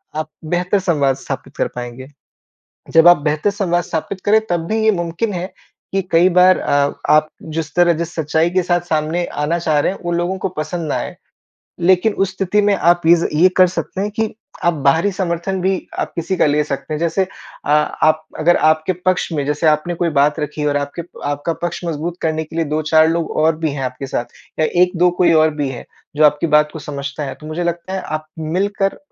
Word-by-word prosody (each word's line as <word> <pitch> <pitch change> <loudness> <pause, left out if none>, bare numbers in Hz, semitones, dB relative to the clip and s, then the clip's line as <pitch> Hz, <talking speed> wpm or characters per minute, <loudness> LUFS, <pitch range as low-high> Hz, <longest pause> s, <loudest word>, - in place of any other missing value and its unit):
आप 155 0 -3 0.3
बेहतर 180 +3 +1
संवाद 145 -8 +1
स्थापित - - -7
कर - - +1
पाएँगे। 125 +1 -7 0.8
जब 165 +1 +6
आप 175 - +8
बेहतर 155 +6 +1
संवाद 175 -4 0
स्थापित 185 +4 -4
करे 215 +2 +5
तब 170 -2 -1
भी 220 +3 0
ये 220 - +5
मुमकिन 175 +3 -2
है 180 +1 -5 0.4
कि 195 - +1
कई 170 +3 +5
बार 185 +1 +5
अ, 145 0 +1 0.2
आप 155 0 +5 0.3
जिस 160 -2 -3
तरह 175 -1 +4
जिस 170 0 -4
सच्चाई 160 +1 +1
के 185 0 +2
साथ 175 -1 +1
सामने 160 +2 0 0.2
आना 170 +3 0
चाह 155 -3 +1
रहे 145 - +1
हैं 195 - -8
उन 175 -1 -2
लोगों 175 +2 -1
को 190 - -2
पसंद 155 +1 -3
ना - - 0
आए। - - -4 0.7
लेकिन 185 +4 +3
उस 190 - -5
स्थिति 195 +2 +1
में 205 0 +3
आप 175 -1 +3
ये 170 - +7 0.3
ये 185 - +8
कर 185 - +7
सकते 185 +1 -4
हैं 205 +1 -1
कि 220 0 -2 0.3
आप 175 -1 +3
बाहरी 165 +8 +3
समर्थन 180 +1 -2
भी 190 +2 +1 0.3
आप - - -2
किसी 175 +3 -2
का - - +3
ले 150 +1 +2
सकते 150 +2 -4
हैं। - - -2
जैसे 170 +3 +1 0.4
अ, - - -2
आप 155 +1 +2
अगर 170 +3 +4
आपके 155 +3 +1
पक्ष 185 0 +1
में 145 -3 -1
जैसे 150 +2 0
आपने 155 +3 +2
कोई 170 0 0
बात 150 +2 +2
रखी 150 0 -3
और 145 -1 +1
आपके 145 +4 -3 0.3
आपका 145 +3 -2
पक्ष 175 +1 -3
मजबूत 170 +1 -3
करने 160 0 -1
के 160 - -11
लिए 165 - +1
2-4 155 +1 +3
लोग 165 0 -1
और 160 -1 +3
भी 160 -2 -1
हैं 135 -2 -4
आपके 130 +2 -5
साथ 120 - -4 0.3
या 155 - +4 0.2
1-2 180 0 +3
कोई 170 -2 +5
और 160 - +3
भी 145 -2 -2
है 120 - -7 0.3
जो 155 - +4
आपकी 150 +2 +3
बात 150 0 +3
को - - -7
समझता 140 +1 -4
है 135 - -5
तो 155 - -10
मुझे 160 +3 -3
लगता 170 +2 -3
है 190 - -2
आप 155 0 -5 0.3
मिलकर 200 0 0
165 Hz, 215 wpm, -18 LUFS, 150-180 Hz, 0.8 s, आप